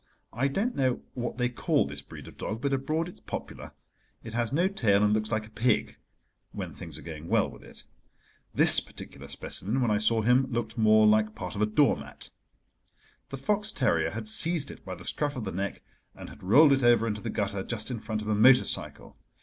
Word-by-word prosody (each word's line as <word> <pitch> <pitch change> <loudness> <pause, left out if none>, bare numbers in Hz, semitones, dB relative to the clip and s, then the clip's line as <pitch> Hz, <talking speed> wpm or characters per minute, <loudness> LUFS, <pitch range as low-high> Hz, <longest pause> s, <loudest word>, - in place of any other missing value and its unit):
I 130 +5 0
don't 205 - -2
know 130 -2 0
what 120 -1 -5
they 125 -1 +1
call 120 -11 0
this 70 +1 -6
breed - - -12
of - - -13
dog, 110 +2 -5
but 140 -1 -1
abroad 155 +5 -1
it 175 - -9
is - - -19
popular: - - -8 0.5
it 115 - -9
has 120 -1 -1
no 170 +6 +2
tail 110 - +2
and 105 0 +3
looks 110 +1 -1
like 110 -1 -1
a 110 - -17
pig—when 110 +2 -4
things - - -8
are - - -12
going 80 -1 -8
well - - +2
with - - -13
it. - - -13 0.7
This - - +6
particular 70 +1 -10
specimen, 100 - -3
when 120 -4 +1
I 105 - +2
saw 110 +1 +3
him, 125 +3 +3
looked 115 -3 -3
more 110 -1 +4
like 105 0 +3
part 90 -3 -6
of 105 - -4
a 105 - +3
doormat. 105 - 0 1.0
The 135 - -6
fox 210 +8 -1
terrier 85 - +1
had 110 +4 -6
seized 160 +7 +4
it - - -14
by - - -7
the - - -11
scruff 145 -1 -1
of 125 - -5
the 95 - -4
neck 100 +3 -4 0.3
and - - -10
had 70 +1 -14
rolled 140 - +6
it 135 - +1
over 120 -1 +4
into 105 -2 -3
the - - -5
gutter 100 -1 -2
just 110 +3 -3
in 120 - -4
front 110 0 -4
of - - -8
a 110 - +1
motor 125 +5 +6
cycle. - - -5
110 Hz, 220 wpm, -27 LUFS, 105-130 Hz, 1.0 s, This